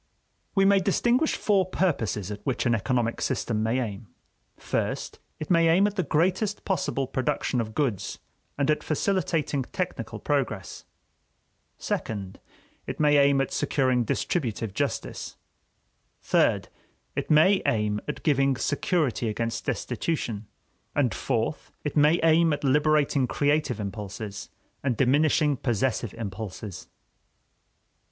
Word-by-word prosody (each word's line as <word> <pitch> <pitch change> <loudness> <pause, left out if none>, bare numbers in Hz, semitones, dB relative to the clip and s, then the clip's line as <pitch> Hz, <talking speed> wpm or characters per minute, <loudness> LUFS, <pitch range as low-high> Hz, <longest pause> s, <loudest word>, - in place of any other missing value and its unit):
We 195 -1 +4
may 200 0 +5
distinguish 240 - +2
four 200 -3 +2
purposes 110 - -1
at 105 - -7
which 130 -1 -1
an 120 - +3
economic 115 +1 0
system 110 -3 -1
may 115 +3 +1
aim: 110 -2 -4 0.5
first, - - -3 0.2
it 155 - -5
may 165 -1 +5
aim 180 +5 +5
at 205 0 -1
the 190 - +1
greatest 185 +6 0
possible 165 -7 0
production 130 -1 -1
of 110 -1 -6
goods 130 -11 -1 0.4
and 140 +1 +2
at 150 - 0
facilitating 160 -3 0
technical 185 +6 -4
progress; 125 -10 -2 0.9
second, 100 -3 -4 0.5
it - - -5
may 150 -1 +4
aim 140 -1 +5
at 135 - -2
securing 130 -3 +1
distributive 115 - -2
justice; - - -3 0.9
third, - - +2 0.5
it - - -3
may 175 +6 +5
aim 105 -2 +1
at 150 - -5
giving 140 -3 +3
security 145 - 0
against 115 +2 -3
destitution; 115 -10 -2 0.5
and, 135 -5 +2
fourth, 120 +3 -2
it 150 - -3
may 150 +3 +5
aim 165 0 +5
at 145 - -4
liberating 145 -1 +3
creative 145 -3 +1
impulses 105 0 -6 0.3
and 130 -5 0
diminishing 145 +3 +3
possessive 120 -2 -1
impulses. 105 -2 -6
135 Hz, 125 wpm, -26 LUFS, 115-155 Hz, 0.9 s, may